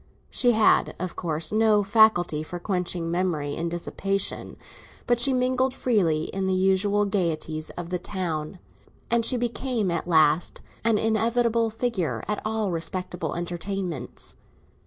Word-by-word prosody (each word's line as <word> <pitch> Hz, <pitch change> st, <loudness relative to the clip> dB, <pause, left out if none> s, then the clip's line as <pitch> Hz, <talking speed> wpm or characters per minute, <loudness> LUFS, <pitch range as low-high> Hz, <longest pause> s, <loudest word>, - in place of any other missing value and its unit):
She 245 Hz, -1 st, +3 dB
had, 220 Hz, -1 st, +3 dB
of 185 Hz, 0 st, -5 dB
course, 160 Hz, -2 st, -1 dB
no 215 Hz, -1 st, +3 dB
faculty 195 Hz, -7 st, +4 dB
for 165 Hz, +3 st, -6 dB
quenching 175 Hz, -2 st, -2 dB
memory 170 Hz, -5 st, -1 dB
in 170 Hz, +1 st, -2 dB
dissipation; 195 Hz, +3 st, -2 dB, 0.5 s
but 240 Hz, -1 st, +2 dB
she 270 Hz, +3 st, +4 dB
mingled 255 Hz, +1 st, +1 dB
freely 175 Hz, -13 st, +1 dB
in 190 Hz, +3 st, -3 dB
the 190 Hz, -, +1 dB
usual 195 Hz, +2 st, +2 dB
gaieties 165 Hz, -5 st, -2 dB
of 175 Hz, 0 st, -6 dB
the 180 Hz, -, -1 dB
town, 175 Hz, -3 st, -4 dB, 0.5 s
and 235 Hz, -1 st, +3 dB
she 250 Hz, +2 st, +4 dB
became 240 Hz, -4 st, -1 dB
at 170 Hz, 0 st, -2 dB
last 160 Hz, -1 st, +2 dB, 0.2 s
an 225 Hz, -1 st, +3 dB
inevitable 230 Hz, +1 st, +1 dB
figure 220 Hz, -6 st, -2 dB
at 210 Hz, -, -2 dB
all 215 Hz, -2 st, -1 dB
respectable 170 Hz, -1 st, -3 dB
entertainments. 175 Hz, -4 st, -4 dB
190 Hz, 135 wpm, -25 LUFS, 170-220 Hz, 0.5 s, faculty